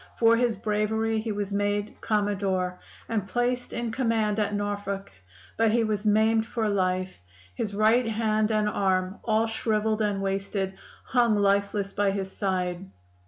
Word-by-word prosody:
For 230 0 +5
his 235 -1 +1
bravery 220 +1 0
he 220 0 -3
was 205 -1 -3
made 205 +1 -1
Commodore, 195 -4 0 0.3
and 215 -4 -2
placed 245 +2 -1
in 235 -1 -3
command 225 -3 0
at 210 -1 0
Norfolk; 205 -1 -3 0.5
but 225 0 +4
he 230 +2 +2
was 215 -1 -1
maimed 220 +1 +3
for 225 -2 -1
life; 185 - -1 0.3
his 200 - -3
right 225 +3 +3
hand 215 -1 +1
and 215 -1 +2
arm, 190 -1 0
all 220 0 +2
shriveled 220 -1 0
and 205 -2 0
wasted, 195 0 -2 0.3
hung 240 -3 +2
lifeless 200 0 +1
by 205 -1 +2
his 195 -1 -3
side. 185 -1 -2
210 Hz, 150 wpm, -26 LUFS, 200-220 Hz, 0.5 s, For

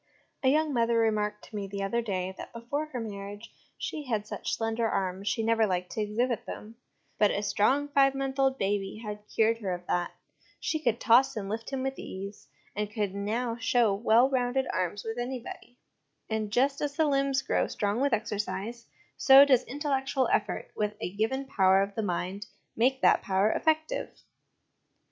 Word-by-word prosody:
A 265 - +1
young 305 +2 +3
mother 235 -1 +2
remarked 210 -2 0
to 220 - -12
me 200 -1 -3
the 200 0 -4
other 235 +5 0
day, 190 -4 -3
that - - -9
before 260 +6 -3
her 260 -5 -5
marriage 205 0 -7 0.2
she 300 -2 -5
had 215 -4 -1
such - - -3
slender 225 0 -1
arms 190 0 -2
she 225 - 0
never 225 -1 +3
liked 180 -1 -2
to 220 - -2
exhibit 230 +3 -1
them; 220 +2 -8 0.4
but 210 - +5
a 200 - -1
strong 235 +8 +2
five 275 -1 +4
months 270 0 -3
old 270 0 +3
baby 200 +1 -2
had 210 0 -6
cured 225 +1 +2
her 190 -5 -2
of 175 0 -11
that; 175 -1 0 0.5
she 315 - -1
could 240 -6 0
toss 245 +3 +5
and 205 -3 -4
lift 225 +2 -4
him 270 -1 -3
with 270 0 -3
ease, 200 +2 -8 0.3
and 210 0 -2
could 210 -3 -2
now 230 +4 -2
show 230 -2 +2
well 230 +4 +4
rounded 260 0 0
arms 185 +2 -2
with 225 +2 -4
anybody: 245 0 -6 0.5
and 220 -1 -1
just 275 +5 +2
as 285 -1 -2
the 315 - +3
limbs 275 -2 +1
grow - - +1
strong 205 +4 -1
with 280 0 +2
exercise, 220 +1 -3 0.3
so 270 +1 +8
does 260 -3 +4
intellectual 270 -1 -1
effort 210 -1 -1
with 210 0 -1
a 180 - -4
given 235 +7 -1
power 195 -6 +4
of 200 0 -5
the 220 - -2
mind 185 +1 -3 0.3
make 260 +3 +2
that - - +5
power 195 +2 +2
effective. 315 +9 0
225 Hz, 185 wpm, -29 LUFS, 205-265 Hz, 0.5 s, so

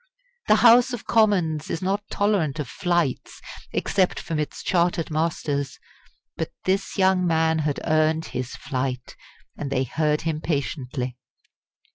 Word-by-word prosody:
The 215 - +6
House 245 +2 +7
of 240 - -5
Commons 180 -9 +2
is - - -2
not 195 +2 0
tolerant 195 -8 +1
of 150 -4 -3
"flights," 175 -4 -1 0.3
except 190 -2 +1
from 160 -3 -3
its 150 - -4
chartered 170 -2 +1
masters. 150 -3 -1 0.6
But - - -2 0.2
this 195 +1 0
young 190 -1 +3
man 160 -1 +2
had 150 -2 -1
earned 155 0 +2
his 125 0 -4
flight; 130 -2 -4 0.4
and 145 - -3
they 130 -1 +1
heard 150 +3 0
him 155 -1 -2
patiently. 130 -5 -3
160 Hz, 135 wpm, -24 LUFS, 145-185 Hz, 0.6 s, House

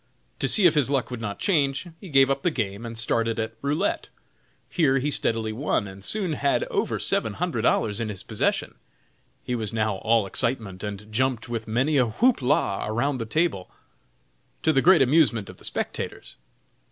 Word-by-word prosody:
To - - 0
see 195 +7 +5
if 170 - +6
his 145 -4 +2
luck 135 -3 0
would 125 -2 -5
not 105 -2 -4
change, 140 -6 +1
he 190 - -11
gave 135 -2 +5
up 135 0 -1
the 175 - +2
game, 110 -5 -3
and 115 0 -8
started 115 0 0
at 110 0 -3
"roulette." 145 +3 -1 0.6
Here 145 -6 +2
he 145 +3 -1
steadily 115 -4 +1
won, 115 -4 -1
and 95 0 -11
soon 190 - 0
had 140 -1 +1
over - - 0
seven - - 0
hundred - - -2
dollars 105 +2 +1
in 110 - -2
his 95 -2 -5
possession. 110 +1 -1 0.7
He 125 - -3
was 110 -4 -1
now 110 -3 0
all 115 +1 +2
excitement, 110 -3 -1
and 105 0 -7
jumped 125 -1 0
with 115 -2 -4
many 130 +7 +1
a 125 -2 +3
"whoop 235 - +2
la" 125 -6 +1
around 125 +5 -1
the 115 - -4
table, 155 - -1 0.9
to 160 - +3
the 135 - +3
great 170 -3 +6
amusement 130 -7 +2
of - - -18
the - - -12
spectators. - - -5
120 Hz, 190 wpm, -25 LUFS, 110-145 Hz, 0.9 s, if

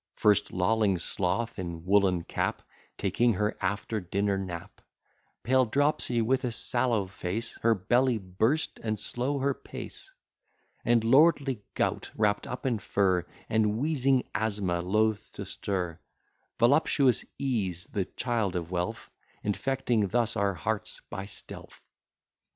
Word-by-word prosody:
First, 105 -2 +3
lolling 100 +1 +2
Sloth, 100 +6 -2
in 85 -2 -5
woollen 95 -3 +3
cap, - - -2 0.3
Taking 115 +5 +2
her 105 +2 0
after 100 +3 -1
dinner 100 +2 0
nap: 90 -3 -6 0.6
Pale 130 0 +3
Dropsy, 135 -2 +2
with 130 +4 +1
a 125 - -1
sallow 120 -2 0
face, 100 +4 -4
Her 115 0 +4
belly 120 +6 +2
burst, 110 - 0
and 110 -2 -1
slow 125 +7 -2
her 140 +1 +1
pace: - - -9 0.7
And 115 -1 +3
lordly 135 -1 +4
Gout, - - 0
wrapt 105 -1 +1
up 125 - -6
in 120 -4 +1
fur, 95 -4 +1 0.2
And 110 -1 +2
wheezing 135 -2 +2
Asthma, 100 -5 0
loth 105 +3 +1
to - - -6
stir: 90 -5 -3 0.6
Voluptuous 135 0 +4
Ease, 100 -11 -1
the 100 -4 -1
child 115 -6 -1
of 85 -1 -3
wealth, 90 0 -3 0.3
Infecting 120 0 0
thus 115 +2 +1
our 100 -3 +1
hearts 105 +6 -3
by 95 - -4
stealth. 100 - -8
110 Hz, 130 wpm, -29 LUFS, 95-120 Hz, 0.7 s, Her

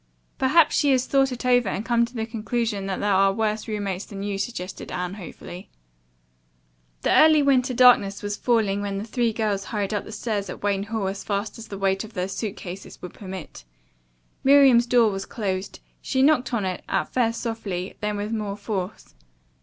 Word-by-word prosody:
"Perhaps 295 +4 +4
she 290 -2 +3
has 255 -1 +2
thought 270 -1 +2
it 250 0 -6
over 245 -4 +3
and 205 - -3
come 235 -1 +3
to 240 +2 -14
the 220 -1 -2
conclusion 225 -2 -2
that 190 - -2
there 205 -1 +2
are 195 +1 +4
worse 215 +2 -1
roommates 205 -3 -3
than 195 -1 -7
you," 200 -1 -3
suggested 190 -3 -5
Anne 180 +1 -3
hopefully. 185 0 -10 1.3
The - - +2
early 310 -1 +6
winter 260 -2 +2
darkness 230 -6 +5
was 205 0 -2
falling 210 -4 +1
when 200 -1 -3
the 200 - -3
three 230 +1 0
girls 210 -3 -1
hurried 210 -2 -2
up 205 - -1
the - - -10
stairs 210 -3 -3
at - - -8
Wayne 200 -1 0
Hall 220 -2 -2
as 195 +1 -4
fast 205 +2 -3
as 230 - -9
the 200 - -7
weight 195 0 0
of 215 0 -11
their 180 0 -1
suit 195 +2 -4
cases 185 +1 -9
would 180 - -7
permit. 185 - -9 0.8
Miriam's 265 -3 +6
door 235 -3 +4
was 195 0 -5
closed. 195 -3 -4 0.2
She 265 -1 +1
knocked 275 -4 +3
on 225 -5 0
it, 185 -1 -3
at 155 - -1
first 230 -2 +1
softly, 205 -6 -4
then 210 -1 -1
with 205 +2 -3
more 210 -3 -3
force. 185 - -5
210 Hz, 195 wpm, -24 LUFS, 195-235 Hz, 1.3 s, early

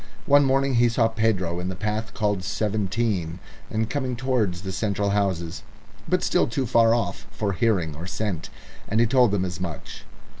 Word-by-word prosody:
One 145 0 +6
morning 135 0 +2
he 120 - +5
saw 115 -1 +2
Pedro 100 -6 0
in 90 +1 -3
the 95 - -4
path 110 +2 -3
called 105 -3 0
Seventeen 100 -4 -1 0.3
and 110 0 -1
coming 130 -1 -2
towards 115 -8 0
the 95 - -4
central 100 0 -1
houses, 90 -5 -1 0.5
but - - +2
still - - +2
too 130 +3 -1
far 115 -1 +4
off 115 -3 -3
for 105 -1 -2
hearing 90 -7 +1
or 85 +4 -7
scent, 95 -4 -3 0.4
and 110 - 0
he 120 - +5
told 125 0 +4
them 100 -2 0
as 90 0 -5
much. 85 -5 -6
105 Hz, 180 wpm, -24 LUFS, 90-115 Hz, 0.5 s, One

